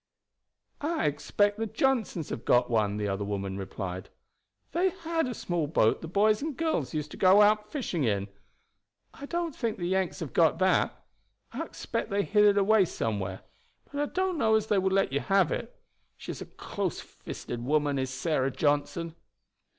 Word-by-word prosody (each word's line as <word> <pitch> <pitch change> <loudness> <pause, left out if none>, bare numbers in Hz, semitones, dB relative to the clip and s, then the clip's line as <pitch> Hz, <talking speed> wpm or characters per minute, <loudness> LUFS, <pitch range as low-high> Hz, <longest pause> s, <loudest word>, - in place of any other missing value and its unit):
"I 310 - 0
expect 205 +8 +1
the 225 - -1
Johnsons 220 - 0
have 115 - -5
got 125 0 +3
one," 105 -3 +1
the 105 -1 -1
other 100 0 -2
woman 100 -1 -3
replied. 95 -1 -5 0.6
"They 360 +3 +2
had 335 -4 -2
a 250 - -4
small 175 -6 -2
boat 115 -7 +2
the 165 - -6
boys 210 - +3
and 300 -2 -4
girls 315 - -1
used 150 -1 -3
to - - -9
go 195 +2 +6
out 210 0 +2
fishing 210 - -2
in. 100 -4 0 0.9
I 280 - -9
don't 340 -2 -2
think 230 -3 -2
the 175 - -3
Yanks 190 0 0
have 155 - -5
got 160 -1 +4
that. 190 +1 +1 0.5
I - - -4
expect - - -4
they 200 0 +1
hid 210 +1 +4
it 205 -1 +5
away 200 0 +5
somewhere; 100 - -3 0.5
but 285 0 -2
I 290 - -2
don't 370 -3 0
know 220 -4 +4
as 215 -1 +2
they 210 -2 +2
would 190 0 +1
let 195 -8 +2
you 140 - +2
have 195 0 +2
it. - - -5 0.4
She - - -6
is - - -8
a - - -7
close - - -4
fisted 120 -1 -7
woman 145 +1 +1
is 130 0 -1
Sarah 135 0 0
Johnson." 145 +4 0
185 Hz, 185 wpm, -28 LUFS, 130-220 Hz, 0.9 s, go